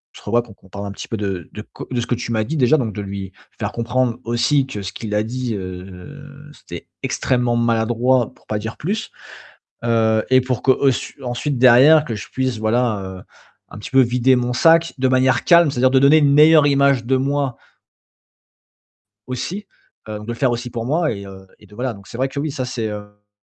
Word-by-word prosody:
se - - -13
revoit, 120 +3 +1
qu'on 105 -5 -17
parle 100 +2 -6
un - - -5
petit - - -8
peu 115 - -4
de 95 -5 -4
de 125 -2 -6
ce - - -5
que 120 - 0
tu 120 0 -5
m'as 110 -1 +1
dit 155 +8 -4
déjà, 130 +3 +4
donc 115 -7 -2
de 105 - -5
lui 95 -1 -6 0.3
faire - - -2
comprendre 120 0 -1
aussi 125 +4 +1
que 105 -7 -7
ce 95 - -6
qu'il 105 -2 -6
a 105 - +2
dit, 120 0 -4
heu, 95 +8 -9 0.3
c'était 85 - -10 0.2
extrêmement 125 -2 0
maladroit, 120 +1 +1
pour - - -28
pas 105 - -2
dire 110 +2 -6
plus. 215 +7 -3 0.7
Heu 110 -2 +2
et 130 - +6
pour 125 -1 -3
que 130 - +5 0.5
qu'ensuite 130 +2 -3
derrière 130 +5 +6
que 115 -6 -4
je - - -8
puisse 130 -3 -2
voilà, 110 -1 0
heu, 95 -1 -8 0.5
un - - -11
petit 105 - -9
peu 135 - +4
vider 125 +1 +3
mon 125 0 -1
sac 165 +5 +4
de 130 0 +1
manière 130 0 +2
calme, 170 -2 +5
c'est-à-dire 130 0 +2
de 130 - +4
donner 140 +3 +6
une 145 -2 +3
meilleure 150 0 +6
image 140 -3 +2
de 130 +2 +2
moi 140 -1 -1 1.7
aussi, 175 - -5 0.4
heu, 105 -1 -5
de - - -10
le 120 - -4
faire 130 +1 +1
aussi 120 +1 -4
pour 115 0 -5
moi 155 +2 +1
et 100 -1 -7
heu, 95 0 -12
de 105 -1 -18
voilà. 125 +2 -3
Donc, 100 -1 -15
c'est - - -9
vrai 135 - +1
que 135 +1 -7
oui, 155 - -2
ça, 130 -2 -4
c'est, 120 -3 -4
hem 105 -1 -9
120 Hz, 210 wpm, -20 LUFS, 110-130 Hz, 1.7 s, et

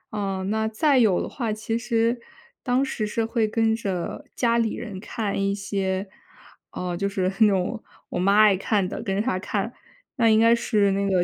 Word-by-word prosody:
嗯， 195 -2 -2
那 220 0 0
再 265 +5 +2
有 210 -7 +4
的 - - -4
话， 230 -4 -3
其 220 +1 -3
实 235 0 0 0.4
当 255 +1 +1
时 220 -5 -3
是 225 +2 -1
会 225 -1 0
跟 225 +1 +1
着 190 -6 -4
家 235 -1 +2
里 225 -2 0
人 210 -5 -7
看 210 0 -3
一 200 0 0
些 195 -1 -2 0.6
呃， 180 -1 -4
就 200 +3 -1
是 195 -2 -2 0.2
那 220 - +7
种 200 +3 -1 0.3
我 - - -3
妈 200 +3 +3
爱 210 -2 +6
看 195 0 0
的， - - -5
跟 195 -3 -2
着 - - 0
她 220 -6 -1
看。 205 +4 -3 0.4
那 230 -2 +3
应 220 0 +5
该 230 +1 +6
是 215 -4 +2
那 200 +1 0
个 185 -2 +3
215 Hz, 215 characters per minute, -24 LUFS, 195-230 Hz, 0.6 s, 那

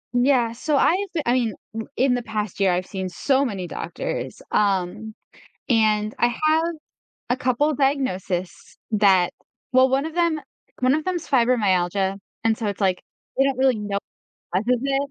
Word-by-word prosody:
Yeah, 245 -2 +3
so 280 +5 -1
I've 385 +7 +2 0.2
I 240 - +3
mean, 235 -5 0 0.2
m 225 0 -5
in 255 0 +3
the 245 - 0
past 215 -3 -4
year, 195 -2 +4
I've 180 +1 0
seen 190 -2 -4
so 270 +10 +1
many 195 -8 -3
doctors, - - -5
um, 205 +2 0 0.5
and 215 -2 +2
I 240 - +4
have 310 +6 +2 0.7
a 250 - +1
couple 260 +5 +1
diagnosis 195 -11 -2
that 195 -4 +4 0.4
well, 260 +1 +6
one 270 +3 +1
of 320 - -5
them 335 -3 +1 0.4
one 255 +3 +4
of 310 - -3
them's 355 -3 -2
fibromyalgia, 195 -7 +2 0.3
and 225 -1 +2
so 220 - -2
it's 200 0 -4
like, 185 -2 +1 0.4
they 270 - +4
don't 270 -2 0
really 260 -4 +3
know 200 -1 -2 0.6
causes 235 +5 +1
it. 275 0 0
235 Hz, 165 wpm, -23 LUFS, 200-270 Hz, 0.7 s, well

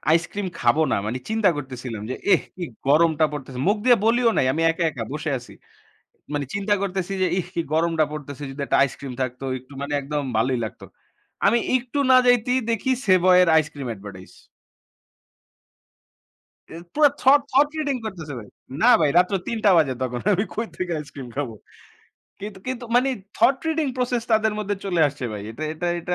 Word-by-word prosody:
ice 165 0 +1
cream 205 -1 -3
খাবো 120 +7 +3
না - - +3
মানে 110 +4 -2
চিন্তা 220 -3 +3
করতেছিলাম। 125 -5 -6
যে 130 - -2 0.2
এহ! - - +5 0.2
কি 180 - -4 0.2
গরমটা 160 +2 +4
পড়তেছে 135 -3 -7
মুখ 205 +2 +3
দিয়ে 245 -2 +6
বলিও 235 +1 +4
নাই - - +3
আমি 160 - -1
একা, 165 +1 -2
একা, 120 -6 -5
বসে 150 +1 -3
আছি। 120 - -13 0.8
মানে 145 -1 -1
চিন্তা 200 +1 +1
করতেছি 190 -1 -2
যে - - +4
ইহ! 175 - -3
কি - - 0
গরমটা 165 0 +2
পড়তেছে। 145 -2 -7
যদি 135 +2 -8
একটা - - +2
ice - - -9
cream 140 -2 -7
থাকতো 130 +1 -5
একটু 130 +2 -18
মানে 140 +1 -4
একদম 145 +1 -3
ভালোই 125 +3 +1
লাগতো 110 - -8 0.6
আমি 235 - +4 0.2
একটু 255 +3 -4
না 260 - +8
যাইতেই 245 +1 +3
দেখি 230 +3 -1 0.2
সেভয়ের 180 -1 +5
ice 155 - -5
cream 140 -3 -6
advertise। 95 -2 -11 2.4
এ - - -10 0.2
পুরা 300 -1 +5
thought, 275 +2 +6
thought 285 +3 +4
reading 285 -3 -1
করতেছে 165 -8 -6
ভাই। 105 - -12 0.3
না 245 - +6
ভাই, 150 - +3
রাত্রে 180 +2 +3
৩ 230 - -2
টা - - +7
বাজে 145 -5 +3
তখন 125 -1 -3
আমি 195 +1 +1
কই 225 +1 -3
থেকে 180 -1 -3
ice 145 - -13
cream 135 -3 -8
খাবো? 135 -6 -2 0.9
কিন 210 +2 -6
কিন্তু 255 -1 -4
মানে 255 +2 +4 0.3
thought 270 - +4
reading 320 -2 0
process 250 -2 0
তাদের 220 0 +3
মধ্যে 205 -1 -2
চলে 180 -4 0
আসছে 145 -2 -5
ভাই 105 -1 -6
এটা 115 +8 -8
এটা 160 +3 -4
এটা 180 +1 -2
170 Hz, 190 wpm, -23 LUFS, 140-220 Hz, 2.4 s, না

